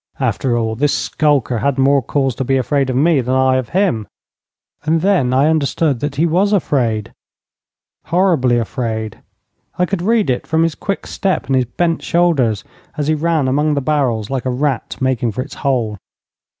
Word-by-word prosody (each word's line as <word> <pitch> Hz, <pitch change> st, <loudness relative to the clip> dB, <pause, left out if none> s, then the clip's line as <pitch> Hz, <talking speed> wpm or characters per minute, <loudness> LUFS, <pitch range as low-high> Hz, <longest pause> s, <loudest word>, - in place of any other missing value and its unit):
After 120 Hz, -3 st, 0 dB
all, 110 Hz, -1 st, -1 dB
this 145 Hz, +4 st, +1 dB
skulker 140 Hz, -6 st, 0 dB
had 140 Hz, +4 st, 0 dB
more 135 Hz, +1 st, +3 dB
cause 135 Hz, +1 st, -1 dB
to 135 Hz, -, -3 dB
be 135 Hz, +1 st, +1 dB
afraid 135 Hz, +1 st, 0 dB
of 130 Hz, -, -1 dB
me 150 Hz, +1 st, +3 dB
than 125 Hz, +1 st, -1 dB
I 130 Hz, 0 st, +3 dB
of 125 Hz, -3 st, -3 dB
him. 175 Hz, -, 0 dB, 0.8 s
And 160 Hz, +1 st, +1 dB
then 185 Hz, -9 st, +2 dB
suddenly 130 Hz, -, +1 dB
I 155 Hz, -, +3 dB
understood 150 Hz, -2 st, 0 dB
that 145 Hz, +1 st, -3 dB
he 155 Hz, +4 st, +2 dB
was 185 Hz, +5 st, +2 dB
afraid 120 Hz, -, 0 dB, 0.9 s
horribly 165 Hz, -9 st, +2 dB
afraid. 110 Hz, -2 st, -3 dB, 0.6 s
I 180 Hz, -, +2 dB
could 190 Hz, -1 st, -3 dB
read 215 Hz, -, +2 dB
it 125 Hz, -, -3 dB
from 160 Hz, 0 st, +2 dB
his 165 Hz, -1 st, 0 dB
quick 195 Hz, +5 st, -4 dB
step 190 Hz, -2 st, -1 dB
and 135 Hz, -, 0 dB
his 130 Hz, -1 st, +2 dB
bent 165 Hz, +7 st, -1 dB
shoulders 145 Hz, -, +1 dB, 0.3 s
as 150 Hz, 0 st, -1 dB
he -, -, +3 dB
ran 155 Hz, -2 st, 0 dB
among 150 Hz, +3 st, +1 dB
the -, -, +1 dB
barrels, 130 Hz, -6 st, -1 dB
like 135 Hz, -2 st, -2 dB
a -, -, 0 dB
rat 130 Hz, 0 st, -2 dB
making 125 Hz, -4 st, 0 dB
for 125 Hz, -, -2 dB
its -, -, -12 dB
hole. 120 Hz, -7 st, -1 dB
135 Hz, 190 wpm, -17 LUFS, 125-160 Hz, 0.9 s, more